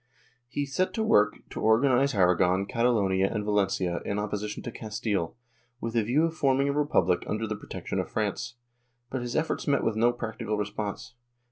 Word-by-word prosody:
He 140 Hz, +3 st, -2 dB
set 140 Hz, +7 st, -1 dB
to 220 Hz, -, 0 dB
work 105 Hz, -, +3 dB
to -, -, -5 dB
organize 125 Hz, +4 st, +3 dB
Aragon, 90 Hz, 0 st, +3 dB
Catalonia 100 Hz, -5 st, +2 dB
and 105 Hz, -2 st, -2 dB
Valencia 95 Hz, -4 st, 0 dB
in 100 Hz, -, -2 dB
opposition 105 Hz, 0 st, -3 dB
to 120 Hz, -, -5 dB
Castile, 105 Hz, -6 st, -3 dB, 0.4 s
with 115 Hz, 0 st, -4 dB
a 115 Hz, -, +4 dB
view 125 Hz, +9 st, +2 dB
of 165 Hz, -, -2 dB
forming 135 Hz, -2 st, +2 dB
a 140 Hz, -, +1 dB
republic 140 Hz, -, +2 dB
under 110 Hz, +1 st, -1 dB
the 110 Hz, 0 st, -3 dB
protection -, -, -5 dB
of -, -, -3 dB
France, -, -, -2 dB, 0.6 s
but 130 Hz, -, -2 dB
his 120 Hz, 0 st, -4 dB
efforts 160 Hz, +1 st, -1 dB
met 140 Hz, -1 st, +2 dB
with 110 Hz, -, +1 dB
no 115 Hz, +2 st, +4 dB
practical 110 Hz, -3 st, -4 dB
response. 105 Hz, +4 st, -4 dB
110 Hz, 175 wpm, -28 LUFS, 100-130 Hz, 0.6 s, a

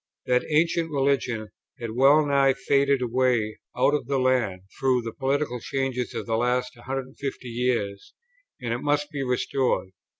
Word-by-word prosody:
That 125 Hz, 0 st, +2 dB
ancient 165 Hz, +2 st, +2 dB
religion 135 Hz, -6 st, 0 dB, 0.3 s
had 115 Hz, -2 st, -4 dB
well 140 Hz, +6 st, +5 dB
nigh 140 Hz, -1 st, +4 dB
faded 140 Hz, -1 st, +2 dB
away 120 Hz, -3 st, +1 dB, 0.2 s
out 130 Hz, +3 st, +3 dB
of 150 Hz, -5 st, -1 dB
the 140 Hz, 0 st, 0 dB
land, 125 Hz, -8 st, +1 dB, 0.2 s
through 130 Hz, -2 st, +2 dB
the 115 Hz, -1 st, -5 dB
political 135 Hz, -1 st, -1 dB
changes 130 Hz, 0 st, -2 dB
of -, -, -3 dB
the 115 Hz, -1 st, 0 dB
last 125 Hz, +1 st, 0 dB
150 130 Hz, +1 st, -5 dB
years, 115 Hz, -5 st, -2 dB, 0.4 s
and 120 Hz, -3 st, -2 dB
it 120 Hz, -, -2 dB
must 145 Hz, +2 st, 0 dB
be 145 Hz, -2 st, -3 dB
restored. 125 Hz, -4 st, 0 dB
130 Hz, 155 wpm, -25 LUFS, 120-140 Hz, 0.4 s, well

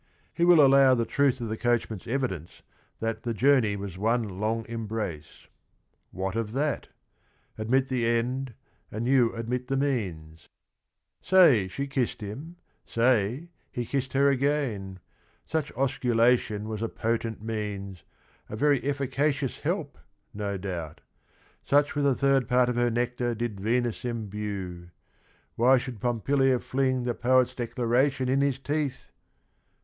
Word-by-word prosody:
He 170 Hz, -, 0 dB
will 170 Hz, -4 st, +7 dB
allow 135 Hz, -1 st, +6 dB
the 115 Hz, -1 st, 0 dB
truth 140 Hz, -1 st, +1 dB
of 115 Hz, -, -3 dB
the 110 Hz, -, -2 dB
coachman, 120 Hz, -4 st, 0 dB
s~evidence 115 Hz, -, -4 dB, 0.4 s
that 115 Hz, 0 st, -2 dB
"the 115 Hz, -2 st, -3 dB
journey 125 Hz, -4 st, +3 dB
was 100 Hz, -2 st, -6 dB
one 115 Hz, +3 st, +1 dB, 0.2 s
long 110 Hz, +1 st, -1 dB
embrace." 110 Hz, -8 st, -5 dB, 0.6 s
What 95 Hz, +2 st, -4 dB
of 115 Hz, -1 st, -2 dB
that? 145 Hz, +2 st, -1 dB, 0.7 s
Admit 130 Hz, +5 st, +1 dB
the 125 Hz, -3 st, 0 dB
end, 120 Hz, +1 st, -1 dB, 0.4 s
a.nrl 110 Hz, +3 st, -3 dB
ynn 125 Hz, -3 st, +3 dB
admit 125 Hz, +2 st, -3 dB
the 135 Hz, -, 0 dB
meam 95 Hz, -, -2 dB, 0.8 s
"Say, 150 Hz, -, +5 dB
she 140 Hz, +9 st, -4 dB
kissed 135 Hz, -3 st, -2 dB
him, 135 Hz, +12 st, -7 dB, 0.3 s
say, 120 Hz, -, +1 dB, 0.2 s
he 120 Hz, -, -3 dB
kissed 130 Hz, +1 st, -3 dB
her 140 Hz, +1 st, +4 dB
again 130 Hz, -9 st, -1 dB
I -, -, -35 dB
Such 155 Hz, -2 st, -1 dB
osculation 120 Hz, -4 st, +2 dB
was 110 Hz, 0 st, -5 dB
a 115 Hz, -, -1 dB
potent 115 Hz, -1 st, -2 dB
means, 100 Hz, -4 st, -4 dB, 0.5 s
A -, -, -5 dB
very 145 Hz, +3 st, +2 dB
efficacious 140 Hz, 0 st, -1 dB
help, -, -, -3 dB, 0.3 s
no 100 Hz, -1 st, -3 dB
doubt: 90 Hz, -5 st, -6 dB, 0.6 s
Such 145 Hz, +1 st, +2 dB
with 145 Hz, -1 st, +1 dB
a 135 Hz, -, +3 dB
third 135 Hz, -3 st, +2 dB
part 125 Hz, 0 st, +3 dB
of 125 Hz, -, -1 dB
her 120 Hz, 0 st, +2 dB
nectar 120 Hz, 0 st, -1 dB
did 115 Hz, -3 st, -4 dB
Venus 120 Hz, +3 st, 0 dB
imbue: 100 Hz, -6 st, -5 dB, 0.7 s
why 130 Hz, +3 st, +5 dB
should 125 Hz, -3 st, -5 dB
Pompilia 130 Hz, +3 st, +2 dB
fling 130 Hz, -1 st, 0 dB
The 120 Hz, -1 st, -1 dB
poet's 130 Hz, +1 st, +2 dB
declaration 125 Hz, +2 st, 0 dB
in 135 Hz, +1 st, +2 dB
his 140 Hz, -2 st, +1 dB
teeth? 140 Hz, 0 st, -3 dB
120 Hz, 140 wpm, -27 LUFS, 110-135 Hz, 0.8 s, will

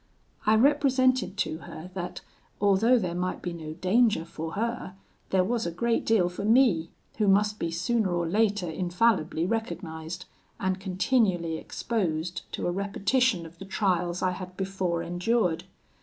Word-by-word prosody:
"I 215 Hz, -, +6 dB
represented 255 Hz, -4 st, +3 dB
to 160 Hz, -6 st, -1 dB
her 165 Hz, +2 st, -9 dB
that, 180 Hz, -1 st, -5 dB, 0.4 s
although 205 Hz, +5 st, +4 dB
there 180 Hz, -6 st, -1 dB
might 180 Hz, +1 st, -3 dB
be 175 Hz, -, -3 dB
no 155 Hz, -2 st, -6 dB
danger 190 Hz, +2 st, +2 dB
for 160 Hz, -1 st, -6 dB
her, 230 Hz, -3 st, -3 dB, 0.3 s
there 190 Hz, -1 st, +3 dB
was 225 Hz, +1 st, -1 dB
a -, -, -2 dB
great 230 Hz, +7 st, 0 dB
deal 215 Hz, -6 st, +4 dB
for 180 Hz, +3 st, -5 dB
me, 215 Hz, -8 st, +4 dB, 0.3 s
who 210 Hz, -, +3 dB
must 210 Hz, +2 st, +3 dB
be 170 Hz, -, -1 dB
sooner 190 Hz, +5 st, 0 dB
or 175 Hz, -1 st, 0 dB
later 205 Hz, 0 st, +1 dB
infallibly 175 Hz, -1 st, +1 dB
recognised, 175 Hz, -6 st, -4 dB, 0.3 s
and 190 Hz, -1 st, -1 dB
continually 190 Hz, -3 st, +1 dB
exposed 175 Hz, -5 st, -3 dB
to -, -, -3 dB
a 175 Hz, -, +1 dB
repetition 200 Hz, +1 st, +1 dB
of 165 Hz, +1 st, -13 dB
the 195 Hz, -, -7 dB
trials 180 Hz, -3 st, 0 dB
I 185 Hz, -, +2 dB
had 185 Hz, 0 st, -8 dB
before 190 Hz, -3 st, -1 dB
endured. 175 Hz, +1 st, 0 dB
185 Hz, 155 wpm, -27 LUFS, 175-220 Hz, 0.4 s, I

